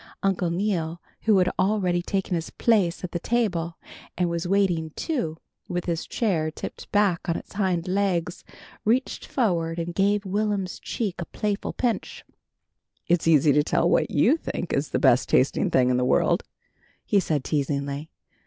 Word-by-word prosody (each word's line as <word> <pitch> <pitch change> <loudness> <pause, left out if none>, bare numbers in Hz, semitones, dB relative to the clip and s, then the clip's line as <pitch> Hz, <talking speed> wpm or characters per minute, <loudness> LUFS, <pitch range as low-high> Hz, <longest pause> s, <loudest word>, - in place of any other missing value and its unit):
Uncle 190 -3 +1
Neal, 170 -3 -1 0.3
who 215 -3 +5
had 180 -1 +3
already 185 -3 +2
taken 190 +1 -2
his 165 -2 -2
place 195 -8 +1
at 180 - -4
the 175 - -2
table, 180 -7 -1 0.4
and 175 -1 +1
was 170 +1 -2
waiting 180 -4 +1
too, 170 - -2 0.3
with 180 -1 -2
his 170 -2 -2
chair 175 -9 0
tipped 155 - -8
back 195 -4 +2
on 165 - +1
its - - -11
hind 185 -4 0
legs, 185 -2 0 0.4
reached 245 +5 0
forward 170 -9 0
and 170 0 -3
gave 200 +2 +1
Will'm's 200 -1 -1
cheek 205 -6 -3
a - - -3
playful 205 +2 -3
pinch. 245 -3 -2 0.8
"It's 170 -1 +2
easy 150 -2 +5
to 150 - +4
tell 150 - +1
what - - +2
you 315 - +3
think 175 - -4
is 140 +2 0
the - - 0
best 120 +1 +4
tasting 130 - +2
thing 125 -1 +3
in 125 - +2
the 125 - +1
world," 125 - +2 0.6
he 205 - +3
said 155 -7 -1
teasingly. 140 +1 -2
175 Hz, 165 wpm, -25 LUFS, 165-200 Hz, 0.8 s, who